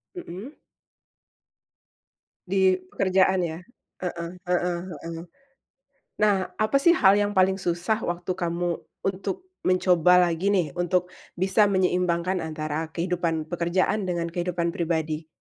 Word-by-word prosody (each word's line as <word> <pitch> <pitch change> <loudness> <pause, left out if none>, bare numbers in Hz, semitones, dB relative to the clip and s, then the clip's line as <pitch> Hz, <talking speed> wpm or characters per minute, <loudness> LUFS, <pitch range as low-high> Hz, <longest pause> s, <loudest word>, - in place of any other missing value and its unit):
Mhm. 230 - -8 2.0
Di 190 0 +4 0.2
pekerjaan 190 -1 +2
ya? 160 0 -5 0.4
Heeh 170 -2 -3 0.2
heeh 180 -1 +1 0.2
heeh. 165 0 -6 1.0
Nah, 200 -3 +2
apa 215 +5 +1
sih, 340 - +7
hal 200 - +5
yang 205 0 +1
paling 190 -1 +3
susah 180 +4 -1
waktu 175 +1 -3
kamu 175 -1 -1 0.3
untuk 195 - -3 0.2
mencoba 180 -1 +4
lagi 175 +4 0
nih, 175 -7 0
untuk 180 0 +1 0.3
bisa 190 +3 +3
menyeimbangkan 180 -1 +1
antara 155 0 -4
kehidupan 170 -2 -1
pekerjaan 175 +5 0
dengan 175 -2 -2
kehidupan 170 0 -2
pribadi? 160 -2 -2
180 Hz, 115 wpm, -25 LUFS, 170-190 Hz, 2.0 s, sih